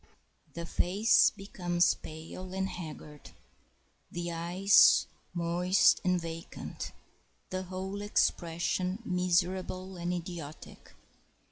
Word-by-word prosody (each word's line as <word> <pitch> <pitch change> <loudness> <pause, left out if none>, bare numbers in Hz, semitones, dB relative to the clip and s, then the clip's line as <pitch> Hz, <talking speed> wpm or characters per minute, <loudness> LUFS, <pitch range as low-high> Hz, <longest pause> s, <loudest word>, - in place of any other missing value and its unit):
] - - -37
The 170 0 -4
face 195 +7 +4
becomes 180 -3 0
pale 165 +4 -9
and 190 0 0
haggard, 150 -4 -9 0.8
the 175 0 -3
eyes 175 +4 +5 0.3
moist 175 +2 +3
and 180 -1 +2
vacant, 165 0 -7 0.6
the 185 0 -2
whole 190 +2 -5
expression 180 0 0
miserable 185 0 0
and 175 0 -2
idiotic. 170 -4 -7
180 Hz, 95 wpm, -30 LUFS, 170-185 Hz, 0.8 s, eyes